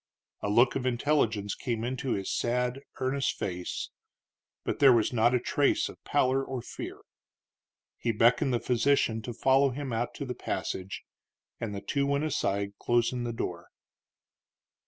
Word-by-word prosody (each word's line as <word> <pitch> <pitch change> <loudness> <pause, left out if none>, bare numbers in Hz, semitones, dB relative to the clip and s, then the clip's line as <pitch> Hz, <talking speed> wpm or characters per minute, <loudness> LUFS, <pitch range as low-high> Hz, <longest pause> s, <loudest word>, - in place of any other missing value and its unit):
A 100 - -1
look 120 +5 +4
of 130 -1 -1
intelligence 120 -6 +1
came 115 -3 -3
into 130 +1 -2
his 95 -1 -2
sad, 125 +2 0 0.2
earnest 135 +1 0
face, 90 -1 -4 0.7
but - - -2
there 140 -2 +8
was 115 0 +3
not 120 +1 +4
a - - +3
trace 140 +3 +1
of - - -13
pallor 135 -1 +2
or 130 -3 -5
fear. - - -7 1.0
He 115 - 0
beckoned 120 +4 +3
the 120 - +1
physician 120 -2 +2
to 120 - -5
follow 135 +4 +3
him 135 -1 -4
out 120 +2 -2
to 140 - -4
the 125 - -3
passage, 95 -5 -4 0.6
and 110 -3 -4
the 100 - -4
two 140 +5 0
went 140 +1 +1
aside, 100 -10 -1
closing 120 +1 +1
the 120 - -2
door. 90 -6 -4
120 Hz, 155 wpm, -29 LUFS, 115-135 Hz, 1.0 s, there